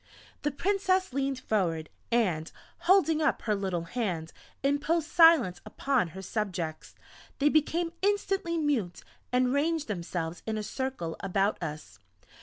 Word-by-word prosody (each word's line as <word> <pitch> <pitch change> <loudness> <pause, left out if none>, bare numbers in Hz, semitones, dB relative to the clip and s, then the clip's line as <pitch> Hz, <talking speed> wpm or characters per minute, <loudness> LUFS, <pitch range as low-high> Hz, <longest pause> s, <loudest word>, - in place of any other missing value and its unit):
The 295 - +1
Princess 375 +1 +1
leaned 270 -1 -1
forward, 165 -7 0 0.2
and, 180 -10 +1 0.4
holding 325 -5 +5
up 310 - +1
her 215 - +1
little 190 -4 -1
hand, 170 -5 -3 0.3
imposed 295 +3 +1
silence 325 - +5
upon 250 0 0
her 190 - -6
subjects. 180 -7 -3 0.4
They 290 +1 +4
became 330 +3 +1
instantly 390 -4 0
mute, 265 - -1 0.3
and 250 0 +2
ranged 310 +2 +1
themselves 170 -4 -4
in 220 -1 -1
a 215 - -3
circle 260 -10 -4
about 195 +1 0
us. 150 - -6
250 Hz, 130 wpm, -29 LUFS, -, 0.4 s, holding